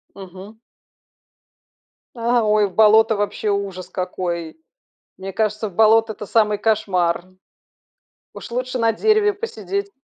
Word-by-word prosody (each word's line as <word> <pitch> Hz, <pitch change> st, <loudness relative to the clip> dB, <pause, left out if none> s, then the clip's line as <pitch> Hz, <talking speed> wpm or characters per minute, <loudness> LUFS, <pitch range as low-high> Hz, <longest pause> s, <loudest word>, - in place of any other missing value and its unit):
Мгм. 195 Hz, +3 st, -12 dB, 1.6 s
А, 235 Hz, 0 st, +1 dB
ой! 210 Hz, -1 st, +2 dB
В 190 Hz, -, -13 dB
болото! 220 Hz, +1 st, +5 dB
Вообще 205 Hz, +1 st, -2 dB
ужас 195 Hz, -2 st, -3 dB
какой! 180 Hz, -, -4 dB, 0.6 s
Мне 190 Hz, +1 st, -7 dB
кажется, 215 Hz, +1 st, -1 dB
в 185 Hz, -, -16 dB
болото- 220 Hz, +1 st, +4 dB
это 210 Hz, -, -9 dB
самый 210 Hz, -1 st, +2 dB
кошмар. 185 Hz, -6 st, 0 dB, 1.1 s
Уж -, -, -10 dB
лучше 255 Hz, +1 st, -3 dB
на 230 Hz, -1 st, +3 dB
дереве 430 Hz, -, +2 dB
посидеть. 405 Hz, -1 st, -5 dB
215 Hz, 120 wpm, -20 LUFS, 195-230 Hz, 1.6 s, болото